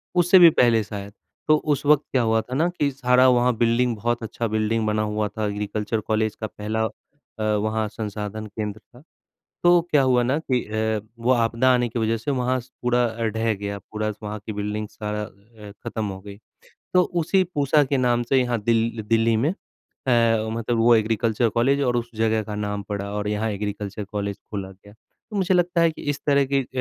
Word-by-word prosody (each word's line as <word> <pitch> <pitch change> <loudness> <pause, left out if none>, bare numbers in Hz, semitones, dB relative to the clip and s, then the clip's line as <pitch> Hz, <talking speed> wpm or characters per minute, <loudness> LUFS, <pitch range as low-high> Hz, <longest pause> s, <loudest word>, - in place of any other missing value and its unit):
उससे 180 +1 +6
भी 170 -1 +10
पहले 120 -7 +3
शायद, 100 -1 -8 0.3
तो 155 - +6
उस 150 -1 -1
वक़्त 150 0 +5
क्या 130 - +2
हुआ 110 -1 +2
था 125 +3 -9
ना 160 +5 +2
कि 160 -5 -1
सारा 130 -1 +3
वहाँ 125 -1 +3
बिल्डिंग 120 +1 +2
बहुत 120 +3 -2
अच्छा 115 +2 -3
बिल्डिंग 110 +1 0
बना 105 0 +1
हुआ 105 0 -1
था 110 +1 -4
एग्रीकल्चर 105 +2 -2
कॉलेज 110 -1 0
का 110 - -2
पहला 110 +1 -3
अ, - - -2 0.5
वहाँ 110 +1 0
संसाधन 105 0 -5
केंद्र 105 0 -5
था, 120 - -20 0.6
तो 175 0 +6
क्या 145 - +4
हुआ 125 -2 +3
ना 130 +5 +1
कि 130 -6 -1
अ, 110 0 -1 0.2
वो 120 +2 0
आपदा 115 +1 +2
आने 120 -1 +1
की 120 - -4
वजह 115 0 +1
से 115 +6 -4
वहाँ 130 -1 0
स 125 +2 -18
पूरा 125 0 +2
अ, 115 0 -4
ढह 110 +1 0
गया, 100 0 -5
पूरा 110 +2 -4
स - - -16
वहाँ 105 0 -5
की 110 - -3
बिल्डिंग 105 +1 -3
सारा 105 0 -4
अ, 105 +1 -12
खत्म 110 - -3
हो 95 -2 -5
गई। 100 0 -10 0.6
तो 180 - +6 0.2
उसी 190 +4 +2
पूसा 145 +1 +3
के 140 0 -1
नाम 120 -2 +2
से 135 - +4
यहाँ 120 -2 0
दिल 115 +1 +1
दिल्ली 115 0 +3
में 135 +7 +1
अ, 115 - -1
मतलब 115 +1 -1
वो 115 +1 +6
एग्रीकल्चर 115 +1 +1
कॉलेज 130 +6 +2
और 125 -3 +1
उस 120 0 -3
जगह 110 0 +1
का 105 0 -6
नाम 105 -1 -3
पड़ा 100 -1 -3
और 105 0 -2
यहाँ 105 +1 -1
एग्रीकल्चर 105 0 -4
कॉलेज 100 0 -4
खोला 100 -2 -5
गया। 100 +2 -17
तो 210 - -16
मुझे 190 0 +2
लगता 175 -1 +2
है 165 -1 +4
कि - - -11
इस 145 - -6
तरह 140 -1 +3
की 135 - +3
अ, 130 - -9
115 Hz, 210 wpm, -23 LUFS, 105-125 Hz, 0.6 s, भी